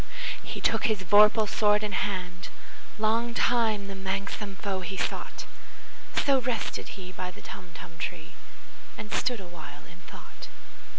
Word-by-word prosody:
He - - -5
took - - +2
his 215 -4 +2
vorpal 210 +3 +7
sword 210 +1 +4
in 210 - -1
hand:Long 205 +5 -2
time 220 -5 +3
the 195 - -5
manxome 195 +1 -3
foe 190 0 -2
he 190 +2 -4
sought—So 275 +6 -2
rested 240 -3 -2
he 185 -1 -7
by 185 -1 -4
the 180 - -12
Tumtum 170 -2 -9
tree, - - -4 0.7
And 210 +1 -7
stood 245 -3 +1
awhile 175 -4 -9
in - - -14
thought. - - -10
200 Hz, 130 wpm, -29 LUFS, 185-215 Hz, 0.7 s, vorpal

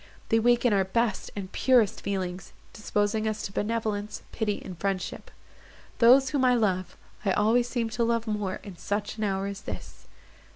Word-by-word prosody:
They 225 - +4
waken 240 0 +3
our 195 -1 +3
best 215 +2 -1
and 195 -2 -5
purest 245 -6 +3
feelings, 185 -2 -4 0.2
disposing 210 0 0
us 215 0 -2
to - - -4
benevolence, 210 -1 -2
pity, 210 -3 -1
and 185 - -7
friendship. 190 +1 -3 0.7
Those 260 +3 +7
whom 280 -3 +1
I 250 -1 +5
love—I 195 -1 -2
always 235 +4 +3
seem 240 -3 -1
to 235 +1 0
love 230 0 +1
more 210 -4 -2
in 195 -4 -9
such 205 +3 -3
an - - -1
hour 195 -1 -1
as 200 0 -5
this." - - -8
210 Hz, 165 wpm, -27 LUFS, 195-230 Hz, 0.7 s, Those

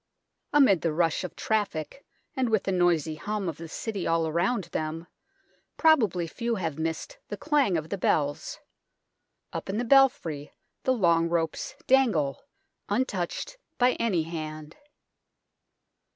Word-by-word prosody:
Amid 265 - +5
the 165 - +1
rush 165 +1 +1
of 180 - -6
traffic 210 - -2 0.3
and 260 -3 +1
with 220 -3 +2
the 195 - -1
noisy 175 -4 +2
hum 210 +2 -3
of 165 - -3
the 165 - -8
City 200 +3 -4
all 165 0 +2
around 180 +7 +1
them, 160 +1 -3 0.7
probably 220 - +4
few 235 +7 -2
have 165 -6 -3
missed 165 - -3
the - - -5
clang 285 - +2
of 155 0 -5
the 200 - -3
bells. 145 -4 0 0.9
Up - - -5
in 195 - -1
the 240 - -1
belfry 230 - +3 0.3
the 260 - +4
long 170 -7 +3
ropes 165 -2 -2
dangle, 220 - +2 0.5
untouched 250 - -2 0.2
by 250 +1 +4
any 190 -8 +1
hand. 155 -1 -6
175 Hz, 135 wpm, -27 LUFS, 160-230 Hz, 0.9 s, Amid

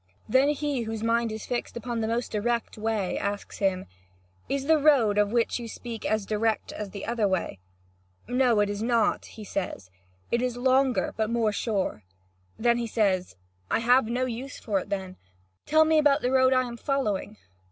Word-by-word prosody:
Then 260 +5 +4
he, 290 -3 -1
whose 225 -1 -4
mind 230 0 +1
is 220 0 -6
fixed 240 -1 -3
upon 235 0 -3
the 220 - -1
most 235 +2 -2
direct 235 +2 -1
way, 215 -3 -1
asks 200 0 -4
him: 190 -2 0 0.6
"Is 275 -1 -1
the 315 +1 +4
road 255 -9 +4
of 205 0 +2
which 235 +1 +1
you 235 - -6
speak 230 0 -6
as 215 -2 0
direct 220 +1 -1
as 210 -1 -5
the 200 0 -7
other 230 -3 +1
way?" 185 - -2 0.7
"No, 245 -3 +3
it 205 - +1
is 205 0 -4
not," 230 -2 +1
he 220 - -11
says; 180 - -4 0.4
"it 235 - +2
is 250 -1 -1
longer, 260 0 +2
but 220 -1 0
more 230 -2 +1
sure." 200 - -2 0.6
Then 235 +1 +2
he 235 - -2
says: 195 - 0 0.3
"I - - +2
have 245 +1 +4
no 245 +3 0
use 255 +3 -5
for 205 -4 -1
it; 190 -1 -5 0.5
tell 315 0 +5
me 315 0 +4
about 295 -1 +3
this 250 - +1
road 260 0 +4
I 255 -1 +4
am 240 -1 -6
following!" 215 -7 -2
230 Hz, 185 wpm, -27 LUFS, 210-250 Hz, 0.7 s, tell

